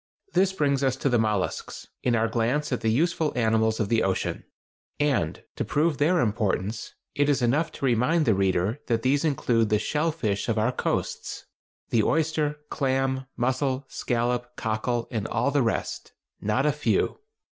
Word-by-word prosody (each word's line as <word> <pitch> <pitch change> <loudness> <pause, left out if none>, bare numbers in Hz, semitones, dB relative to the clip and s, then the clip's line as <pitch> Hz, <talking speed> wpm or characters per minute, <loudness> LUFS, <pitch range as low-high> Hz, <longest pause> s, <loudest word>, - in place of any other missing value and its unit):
This 190 +1 +3
brings 140 -7 +1
us 130 -2 +2
to 135 - 0
the 120 -2 +3
mollusks, 105 -4 -2 0.2
in 120 -2 +2
our 115 0 +2
glance 120 +7 0
at 125 -3 -1
the 110 - +1
useful 160 +5 +1
animals 110 -1 +2
of 105 - +1
the 115 +1 +2
ocean; 95 -1 -1 0.6
and 135 - 0
to - - 0
prove 150 -1 +1
their 165 +4 +3
importance, 105 -1 -1 0.2
it 145 0 +2
is 140 -3 +2
enough 145 +8 +2
to - - -3
remind 135 +7 +2
the 115 - +4
reader 95 +5 +1
that 115 -2 0
these 140 +3 +2
include 120 -7 +1
the 105 - +3
"shell 150 +9 0
fish" 110 -9 -2
of 115 - +1
our 110 +3 +2
coasts—the 115 -2 -3
oyster, 150 +2 0
clam, 135 -1 0
mussel, 130 +2 0
scallop, 120 0 -1
cockle, 115 +1 -1
and 110 -2 -2
all 140 - 0
the 145 0 +2
rest—not 115 +1 -2
a 150 - +4
few! 150 +1 0
125 Hz, 165 wpm, -26 LUFS, 110-145 Hz, 0.6 s, the